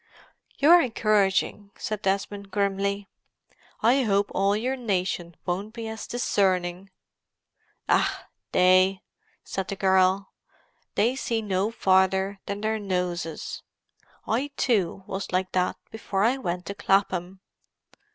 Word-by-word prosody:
"You're 340 +5 +7
encouraging," 210 - +1
said 215 -1 -4
Desmond 200 +1 -2
grimly. 200 0 -1 0.8
"I 250 +5 +5
hope 205 -4 +1
all 200 +2 +2
your 255 +4 -1
nation 185 -7 -2
won't 200 +5 -3
be 230 -1 -5
as 220 0 -6
discerning." 185 -5 0 1.0
"Ach—they!" 185 +1 +2 0.4
said 190 -1 -4
the 195 - -4
girl. 190 0 +2 0.6
"They 240 +4 +2
see 230 -4 -2
no 195 0 0
farther 190 -1 +2
than 200 0 -4
their 220 0 0
noses. 180 -5 -3 0.6
I, 245 +6 0
too, 195 -6 +1
was 195 -1 -5
like 185 0 0
that 180 0 0
before 200 -3 -2
I 240 +4 +3
went 180 -7 -3
to 200 - -4
Clapham." 195 -2 0
195 Hz, 115 wpm, -26 LUFS, 185-215 Hz, 1.0 s, You're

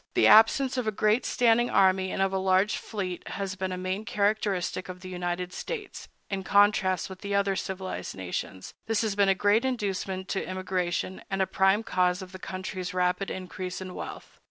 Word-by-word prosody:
The - - +4
absence 255 +4 +6
of 250 -3 -1
a - - +2
great 215 +3 +2
standing 240 0 +3
army 190 0 +3
and 195 - 0
of 195 0 0
a 190 - +1
large 190 +2 +3
fleet 190 -5 -5
has 195 -1 -3
been 190 0 -3
a 185 - -3
main 185 +3 -3
characteristic 200 -3 -1
of 180 0 -8
the 185 - -8
United 180 0 -3
States, 455 -4 -6 0.2
in 195 -1 -3
contrast 200 -2 +3
with 190 -1 -10
the 200 0 -2
other 200 -1 +2
civilized 190 -1 -4
nations; 95 0 -5
this 225 0 +1
has 215 -3 -1
been 200 -1 +4
a 195 - +4
great 205 +4 +3
inducement 195 -6 -2
to 195 - -1
immigration, 185 0 -2
and 195 - -2
a 190 - +3
prime 195 +3 +2
cause 180 -1 +1
of 185 - -11
the 185 - -9
country's 185 0 -5
rapid 180 +2 +1
increase 185 0 -5
in 185 -1 -7
wealth. - - -8
190 Hz, 195 wpm, -27 LUFS, 185-205 Hz, 0.2 s, absence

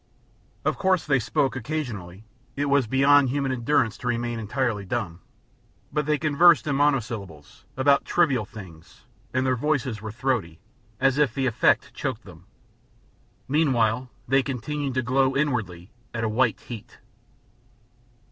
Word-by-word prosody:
Of - - 0
course 190 -3 +2
they 140 -3 +2
spoke 135 +4 0
occasionally 115 - -5 0.3
it 145 - -1
was 140 -4 +3
beyond 140 +2 +4
human 135 0 -1
endurance 120 -3 0
to 125 - -5
remain 120 -1 -1
entirely 115 -1 -1
dumb 95 -4 -4 0.7
but 150 0 -1
they 150 0 +2
conversed 155 0 +4
in 145 -2 0
monosyllables, 115 - -2
about 140 +1 +4
trivial 140 -10 +2
things, 95 -7 -13 0.3
and 130 0 0
their 130 -1 +2
voices 130 -5 -1
were 110 -1 -6
throaty, 110 -9 -2 0.4
as 135 +1 +2
if 140 -7 +2
the 135 - 0
effort 120 -3 +2
choked 120 -4 -4
them. 90 -2 -15 1.0
Meanwhile 130 -5 +1 0.2
they 135 +2 +4
continued 140 +1 -4
to 130 - +1
glow 130 +2 +2
inwardly 110 - -2 0.2
at 115 - -2
a - - +1
white 120 0 +1
heat. 115 -4 -10
130 Hz, 140 wpm, -25 LUFS, 110-140 Hz, 1.0 s, beyond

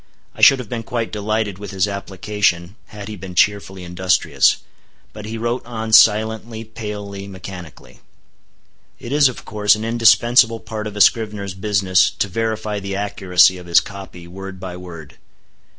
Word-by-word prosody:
I - - -11
should 135 - +8
have 125 -3 -7
been 115 +1 -4
quite 115 0 -4
delighted 105 -1 -2
with 105 - -8
his 95 0 0
application, 100 -2 -2
had 105 -1 -9
he 110 - -6
been 95 -2 -9
cheerfully 95 -1 +1
industrious. 90 +1 +2 0.6
But 105 -1 -9
he 110 +1 -5
wrote 120 +2 -2
on 110 -2 -6
silently, 110 +1 +4
palely, 105 -3 -7
mechanically. 90 -4 -11 1.0
It 120 - -8
is, 145 -2 +4
of 125 - -10
course, 105 -1 +2
an 110 +1 -5
indispensable 115 0 +4
part 110 -1 -6
of 105 - -8
a 105 - -1
scrivener's 105 -3 +2
business 95 -2 +2
to - - 0
verify 110 0 -3
the 100 0 -5
accuracy 95 -2 +2
of 90 - -12
his 85 - +5
copy, 95 -3 -10
word 95 +1 -9
by 90 -1 -7
word. 85 -5 -11
105 Hz, 160 wpm, -19 LUFS, 95-110 Hz, 1.0 s, should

